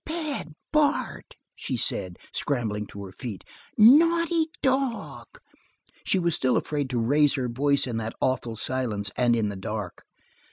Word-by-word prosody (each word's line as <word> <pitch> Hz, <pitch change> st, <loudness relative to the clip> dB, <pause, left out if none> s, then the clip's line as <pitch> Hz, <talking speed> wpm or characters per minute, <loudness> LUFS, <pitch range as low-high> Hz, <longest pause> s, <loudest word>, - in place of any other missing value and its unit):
"Bad 310 Hz, -, -3 dB, 0.2 s
Bart!" 305 Hz, +11 st, 0 dB, 0.2 s
she -, -, -4 dB
said, -, -, -1 dB, 0.2 s
scrambling 110 Hz, -7 st, -2 dB
to 100 Hz, -, -9 dB
her 95 Hz, -, -10 dB
feet. 105 Hz, 0 st, -7 dB, 0.3 s
"Naughty 330 Hz, +7 st, +5 dB, 0.2 s
dog!" 265 Hz, -3 st, -1 dB, 0.8 s
She -, -, +1 dB
was 170 Hz, -2 st, +1 dB
still 130 Hz, -3 st, +2 dB
afraid 145 Hz, -3 st, -2 dB
to 125 Hz, -, -2 dB
raise 145 Hz, +5 st, +3 dB
her 130 Hz, -3 st, -1 dB
voice 140 Hz, +4 st, +1 dB
in 120 Hz, -3 st, -3 dB
that 115 Hz, 0 st, -4 dB
awful 125 Hz, -3 st, -1 dB
silence, 110 Hz, -5 st, -2 dB
and 120 Hz, -1 st, +3 dB
in 110 Hz, -3 st, 0 dB
the 100 Hz, -, -5 dB
dark. 100 Hz, -1 st, -5 dB
130 Hz, 150 wpm, -26 LUFS, -, 0.8 s, Naughty